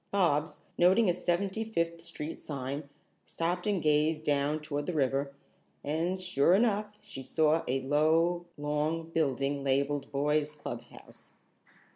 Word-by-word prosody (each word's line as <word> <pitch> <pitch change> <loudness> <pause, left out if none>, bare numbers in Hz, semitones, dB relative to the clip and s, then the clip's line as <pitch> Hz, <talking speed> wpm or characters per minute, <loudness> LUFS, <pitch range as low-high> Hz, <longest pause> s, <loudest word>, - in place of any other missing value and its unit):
Bobs, 160 -6 +1
noting 185 +3 +5
a - - -1
Seventy 190 +4 0
fifth 170 -6 -2
Street 155 -1 -7
sign, 140 0 -4 0.3
stopped 175 +3 -2
and 200 -5 0
gazed 155 +1 +2
down 145 +1 +1
toward 145 -1 -4
the 180 - -1
river, 140 0 +1 0.5
and 165 +6 -1
sure 180 -2 +3
enough 210 -1 +1
she 205 -10 -8
saw 155 +3 +2
a 130 +1 0
long, 160 +5 +2
low 150 +3 -1
building 140 -4 -1
labeled 140 +1 0
Boys' 150 +1 +1
Club 120 -5 -6
House. - - -15
155 Hz, 135 wpm, -30 LUFS, 145-175 Hz, 0.5 s, noting